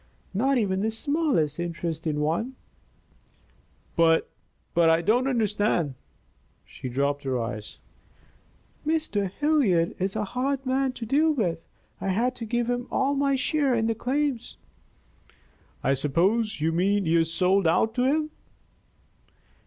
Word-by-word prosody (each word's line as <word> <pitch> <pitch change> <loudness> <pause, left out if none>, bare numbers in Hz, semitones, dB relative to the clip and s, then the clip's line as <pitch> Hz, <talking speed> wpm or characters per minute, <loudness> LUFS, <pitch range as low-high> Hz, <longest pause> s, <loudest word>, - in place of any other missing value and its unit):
"Not 265 +7 +2
even 195 -5 0
the 215 +3 0
smallest 225 - 0
interest 170 -1 -3
in 150 -1 -1
one." 175 +13 -1 1.4
"But 165 -1 +3 0.4
I 165 -1 +5
don't 245 +8 +2
understand." 210 - +1 0.7
She 130 - -8
dropped 140 +3 -1
her 130 -2 -1
eyes. 110 - -5 1.1
"Mr. 305 - 0
Hilliard 225 - +2
is 190 +2 -1
a 215 - 0
hard 255 +5 -2
man 260 0 +1
to 235 - -6
deal 305 +7 +3
with. 175 - -1 0.4
I - - -3
had 230 +7 +1
to 230 - -5
give 240 +1 -1
him 245 0 -2
all 270 +1 +1
my 280 -1 +2
share 280 -1 +1
in 225 -1 +1
the 225 - +1
claims." 260 +2 -2 1.3
"I 135 - +3
suppose 185 - +1
you 160 +1 +2
mean 195 +4 +1
you 165 0 +3
sold 180 +3 +2
out 220 +7 +2
to 250 +1 +1
him." 305 +3 +1
215 Hz, 135 wpm, -26 LUFS, 165-260 Hz, 1.4 s, I